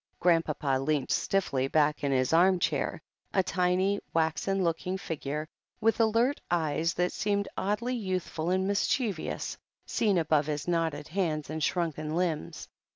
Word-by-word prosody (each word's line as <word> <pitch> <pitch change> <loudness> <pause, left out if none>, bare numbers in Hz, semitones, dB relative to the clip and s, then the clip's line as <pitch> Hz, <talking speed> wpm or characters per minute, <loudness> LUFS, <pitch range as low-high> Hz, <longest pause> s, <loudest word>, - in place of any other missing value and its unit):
Grandpapa 155 -6 +2
leant 140 0 0
stiffly 140 -9 +1
back 150 +1 +2
in 140 - +1
his 130 +2 +1
arm 180 +3 +5
chair, 175 - -1 0.4
a 190 - +4
tiny, 185 +2 +1 0.2
waxen 165 +4 +1
looking 175 +2 -1
figure, 155 -3 -4 0.3
with 225 +1 +2
alert 230 +5 +2
eyes 165 -1 0
that 180 0 0
seemed 200 -1 0
oddly 210 +6 -1
youthful 185 -6 -2
and 190 +1 +1
mischievous, 205 - -1 0.3
seen 205 -5 +1
above 155 -3 +2
his 150 0 -3
knotted 165 -4 -1
hands 160 -5 -1
and 160 0 -4
shrtmken 155 -2 -1
limbs. 165 - -2
170 Hz, 140 wpm, -29 LUFS, 155-195 Hz, 0.4 s, arm